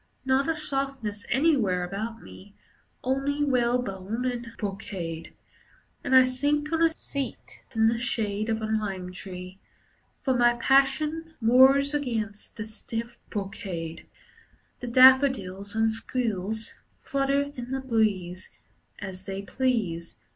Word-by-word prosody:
Not 265 +3 +2
a 325 - +1
softness 270 -8 -3
anywhere 245 - +2
about 215 +5 -5
me, 200 +1 -13 0.5
Only 275 +3 0
whalebone 240 -4 0
and 240 -2 -2
brocade. 185 -5 -5 0.7
And 270 -2 +2
I 260 - +9
sink 290 +4 0
on 325 - +1
a 325 -1 +3
seat 275 -4 -5
in 220 0 +4
the 230 +1 +1
shade 215 -2 -1
Of 220 0 -1
a - - +1
lime 200 -4 -2
tree. 185 0 -8 0.6
For 265 - +2
my 240 -1 +4
passion 300 +6 +2
Wars 265 +4 +6
against 225 -9 -3
the 215 - -4
stiff 230 +1 -6
brocade. 180 -5 -5 0.7
The 245 - -6
daffodils 240 -6 +5
and 220 0 +2
squills 220 -2 -2 0.3
Flutter 275 +1 0
in 245 -1 -6
the 265 0 -2
breeze 205 -7 0 0.5
As 190 -1 -7
they 195 0 -4
please. 200 -8 -1
230 Hz, 125 wpm, -27 LUFS, 200-265 Hz, 0.7 s, I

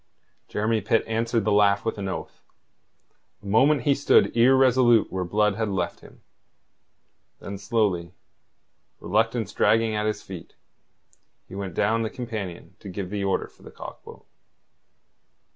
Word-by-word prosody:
Jeremy 110 +1 0
Pitt 110 +3 +1
answered 115 -1 -1
the 105 - +1
laugh 100 0 +3
with 115 - -2
an 100 - -3
oath. 95 - -6 1.0
A - - -15
moment 130 +7 +3
he 140 - +3
stood 140 -3 +3
irresolute 125 -1 +4
where 95 -1 -2
Blood 105 +3 +1
had 110 -2 -1
left 95 -3 -2
him. - - -17 1.2
Then 100 0 -7
slowly, 100 -6 -1 0.8
reluctance 115 -3 0
dragging 110 +1 +2
at 105 0 -1
his 105 - -3
feet, 90 -4 -10 0.9
he - - -13
went 95 -3 -5
down 115 +1 +1
the 110 - -1
companion 110 -9 -7
to 100 - -10
give 95 0 -6
the 100 -1 -2
order 95 - 0
for - - -25
the - - -12
cock - - -10
boat. - - -13
105 Hz, 145 wpm, -25 LUFS, 100-115 Hz, 1.2 s, irresolute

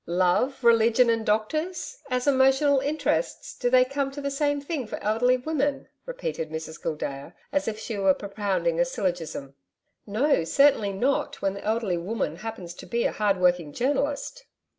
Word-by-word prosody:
'Love, 185 +10 +1
religion 235 +1 +5
and 225 -1 0
doctors! 315 - -1
As 250 -1 -1
emotional 270 +1 +4
interests, 310 - -2
do 245 - 0
they 255 0 +5
come 275 +1 -2
to 275 +1 -8
the 280 0 -3
same 290 +1 0
thing 280 -4 -4
for - - -5
elderly 245 +4 +3
women?' 285 +1 -2 0.2
repeated - - -4
Mrs 160 +1 -7
Gildea, 150 0 -4 0.2
as 290 - 0
if 215 -1 -2
she 220 -1 -5
were 190 -1 +4
propounding 195 -5 -1
a - - +5
syllogism. 170 -7 -3 0.5
'No, 235 - +2
certainly 220 - +3
not, 250 +8 -1
when 195 - +1
the 200 - -8
elderly 215 -4 0
woman 180 -3 -3
happens 190 -4 -7
to - - -12
be 235 0 0
a - - +1
hard 205 -2 +1
working 175 -4 +2
journalist.' 285 - -1
230 Hz, 165 wpm, -26 LUFS, 185-280 Hz, 0.5 s, religion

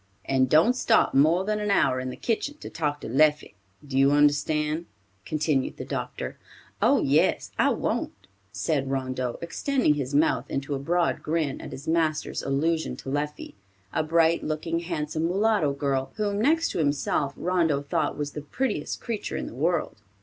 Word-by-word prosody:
"And 130 -1 +2
don't 165 - +5
stop 230 -3 +3
more 160 +7 +4
than 210 0 0
an 210 0 -2
hour 135 -9 +3
in 130 0 -4
the 125 - -6
kitchen 275 +6 -2
to - - -9
talk 150 -2 -2
to - - -6
Leffie. 150 +1 +2 0.3
Do 135 -1 -1
you 135 0 +6
understand?" 150 +2 +2 0.4
continued 150 -3 0
the - - -6
doctor. - - -5 0.4
"Oh, - - +4
yes, - - +2
I - - +4
won't," - - -2 0.3
said 135 +3 -1
Rondeau, 130 -2 -2
extending 255 - +1
his 140 -1 -3
mouth 155 +3 +2
into 140 +1 -3
a 135 - -2
broad 170 +5 0
grin 155 -3 -1
at - - -8
his 140 +4 -9
master's 160 -1 0
allusion 160 +4 0
to - - -8
Leffie, 150 +2 -3 0.4
a - - +1
bright 165 +1 +2
looking, 160 +2 -2
handsome, 160 -2 -2
mulatto 195 -4 +2
girl, 135 -1 -2
whom 205 -1 -1
next 325 +7 +3
to - - -3
himself, 145 -1 0
Rondeau 165 -6 +1
thought 150 +1 -1
was 145 -1 -3
the 150 - -6
prettiest 255 - -3
creature 230 -4 -4
in - - -3
the - - -8
world. 155 -4 -1
155 Hz, 170 wpm, -26 LUFS, 140-170 Hz, 0.4 s, you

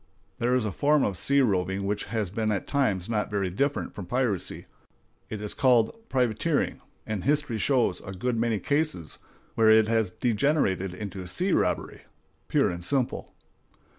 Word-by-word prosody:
There 125 +2 +2
is 125 -3 +1
a 105 - -1
form 145 +7 +2
of 100 - 0
sea 140 +10 +4
roving 95 -4 0
which 105 +1 -2
has 110 -5 -3
been 110 +1 -1
at 100 - -2
times 110 -11 0
not 110 -2 -1
very 100 -3 -1
different 140 +9 -1
from 95 -4 -8
piracy; 120 -5 -1 0.6
it 110 - -5
is 105 - -4
called 125 - +3
privateering, 125 -5 0 0.2
and 105 -4 -3
history 145 -5 +1
shows 120 -9 +1
a 95 - -8
good 120 +6 -2
many 115 -1 +1
cases 145 - -1 0.3
where 110 -1 +4
it 110 0 +6
has 110 -3 +1
degenerated 105 - 0
into 95 -2 -6
sea 180 - 0
robbery - - 0 0.5
pure - - +2
and 85 0 -6
simple. 130 +4 -1
110 Hz, 165 wpm, -27 LUFS, 95-130 Hz, 0.6 s, it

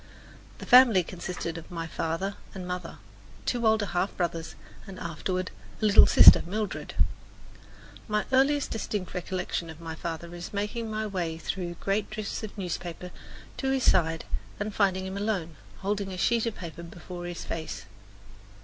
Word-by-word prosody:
The - - -8
family 245 -7 +8
consisted 175 -1 -5
of 165 - -14
my 165 -2 -4
father 165 +4 -2 0.2
and 185 -2 -6
mother, 180 0 -5 0.5
two 240 -2 +1
older 220 -1 +3
half 185 0 -1
brothers, 170 -2 -2 0.3
and, 195 -1 -8
afterward, 185 +2 -3 0.3
a 220 - 0
little 210 0 +8
sister, - - +10
Mildred. 210 +4 -4 1.1
My 210 -1 0
earliest 275 +2 +3
distinct 210 -4 -3
recollection 180 -2 -3
of 160 0 -10
my 165 -1 -6
father 170 +1 -5
is 175 +3 -7
making 210 +3 -2
my 215 0 -2
way 175 -6 -2
through 175 +1 -4
great 200 +4 -1
drifts 215 -1 -4
of 215 -1 -7
newspapers 180 -1 -4 0.5
to 265 - -1
his 265 -1 +1
side 165 -2 +3 0.3
and 205 +1 -2
finding 190 -2 +2
him 190 +1 -4
alone, 195 -6 -1 0.3
holding 200 0 -1
a 185 - -5
sheet 230 +4 +2
of 230 - -2
paper 170 -1 -7
before 175 +1 -8
his 175 -1 -6
face. 160 -1 -5
185 Hz, 160 wpm, -28 LUFS, 170-210 Hz, 1.1 s, sister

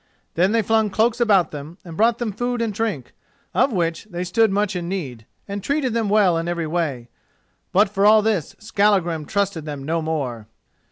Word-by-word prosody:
Then 185 +4 +2
they 225 0 +2
flung 220 +1 +2
cloaks 225 +4 +1
about 200 -6 +3
them, 150 +4 -8
and 165 -2 -9
brought 225 +5 +3
them 235 -3 -2
food 245 +4 -2
and 230 -2 -1
drink, 190 - -3 0.4
of 275 - +3
which 170 -2 -1
they 180 -4 -5
stood 220 +5 +2
much 205 0 0
in 175 -1 -3
need, 130 - -5 0.2
and 200 0 -4
treated 275 -1 0
them 225 -3 0
well 195 -5 +3
in 165 - -4
every 170 -1 -2
way. 155 -7 -2 0.6
But 205 +4 +4
for 195 0 -1
all 215 +1 +6
this 205 -9 -1
Skallagrim 185 -7 +1
trusted 195 -3 -1
them 145 -3 -6
no 165 +3 -1
more. 135 -9 -3
195 Hz, 190 wpm, -22 LUFS, 165-220 Hz, 0.6 s, all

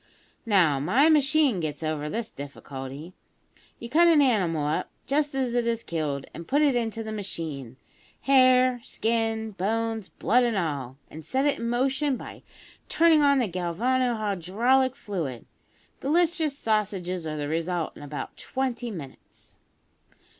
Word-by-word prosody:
Now, 175 -10 +4
my 235 - +4
machine 295 - +3
gets 155 -1 -4
over 155 -1 -2
this 225 +5 -4
difficulty. 140 +3 -8 0.6
You 235 - -8
cut 335 +7 +4
an 330 -3 +6
animal 185 - +2
up 150 +1 -1 0.2
just 290 0 0
as 260 -3 -1
it 240 -1 +1
is 230 0 -1
killed, 150 -4 -3
and 170 - -9
put 290 +2 +2
it 280 -4 +3
into 225 -1 -2
the 220 - -6
machine 160 - -5 0.4
hair, 255 -2 +5
skin, 225 -1 -1
bones, 220 +2 -2
blood, 245 +3 +2
and 235 -3 0
all 140 -7 -3
and 160 +1 -9
set 265 - 0
it 290 - +1
in 235 - -2
motion 265 +3 +1
by - - -10 0.5
turning 325 -2 +5
on 280 -1 +4
the 245 -4 +1
galvano 230 +8 0
hydraulic 220 +6 +1
fluid. 165 - -5 0.5
Delicious 320 0 +1
sausages 190 - -1
are 155 0 -4
the 145 -1 -3
result 165 +2 -2
in - - -12
about 145 0 -6
twenty 255 -2 -3
minutes. 155 -11 -11
220 Hz, 145 wpm, -26 LUFS, 165-260 Hz, 0.6 s, an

